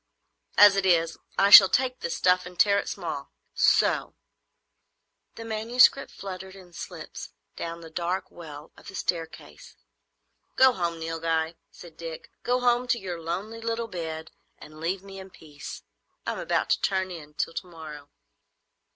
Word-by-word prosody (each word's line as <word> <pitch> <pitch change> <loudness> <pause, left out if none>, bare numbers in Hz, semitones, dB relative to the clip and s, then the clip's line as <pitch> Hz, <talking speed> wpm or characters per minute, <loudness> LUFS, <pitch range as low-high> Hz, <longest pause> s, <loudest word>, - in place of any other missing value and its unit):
"As 205 -1 +8
it 195 - +1
is, 165 -3 +2 0.2
I 200 +1 +4
shall 195 -2 +12
take 255 0 0
this 170 - -3
stuff 180 0 +2
and 180 0 -12
tear 200 -1 +5
it - - -5
small—so!" - - 0 1.2
The 230 - -8
manuscript 230 +5 +3
fluttered 190 -1 -8
in 180 -2 -15
slips - - -8 0.2
down 170 0 -6
the 165 -1 -11
dark 175 +3 -3
well 150 -3 -11
of - - -16
the 195 - -9
staircase. 165 - -5 0.8
"Go 260 0 +6
home, 170 -4 -2
Nilghai," 165 0 -1 0.2
said 170 -2 -14
Dick; 165 -1 -8
"go 250 +1 0
home 245 0 +2
to 245 -1 +2
your 180 -5 -6
lonely 200 +8 -5
little 230 0 -2
bed, 160 -4 -6 0.3
and 155 0 -13
leave 180 +4 -2
me 195 -1 -10
in 190 0 -10
peace. 150 -5 -10 0.4
I - - -1
am - - -5
about - - 0
to - - +2
turn 190 -1 0
in 150 -3 -10
till 165 - -2
to 180 - -5
morrow." 155 -4 -10
180 Hz, 160 wpm, -26 LUFS, 165-200 Hz, 1.2 s, shall